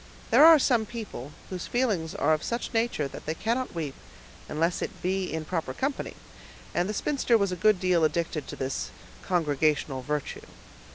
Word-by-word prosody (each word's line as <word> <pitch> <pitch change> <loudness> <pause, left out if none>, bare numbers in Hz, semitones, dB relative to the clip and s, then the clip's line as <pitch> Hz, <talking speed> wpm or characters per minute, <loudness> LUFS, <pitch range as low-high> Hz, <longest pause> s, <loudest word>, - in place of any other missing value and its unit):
There - - +7
are 325 0 +10
some 240 -6 +2
people, 210 - -7 0.2
whose 180 -2 -4
feelings 210 -11 0
are 155 +2 +3
of 155 - 0
such 235 +1 -3
nature 225 -10 +1
that 135 - -10
they 160 - -1
cannot 235 +3 -1
weep 155 -5 -3 0.6
unless 165 +3 0
it - - -4
be 185 0 0
in 160 0 -3
proper 160 -6 -3
company, 275 +1 -2 0.6
and 180 +3 +1
the - - -1
spinster 260 -4 +2
was 200 -3 +1
a - - -1
good 210 +2 +3
deal 180 -3 +2
addicted 155 -2 0
to - - -6
this 130 0 -3 0.3
congregational 150 -5 +1
virtue. 150 +2 -4
175 Hz, 175 wpm, -27 LUFS, 155-225 Hz, 0.6 s, are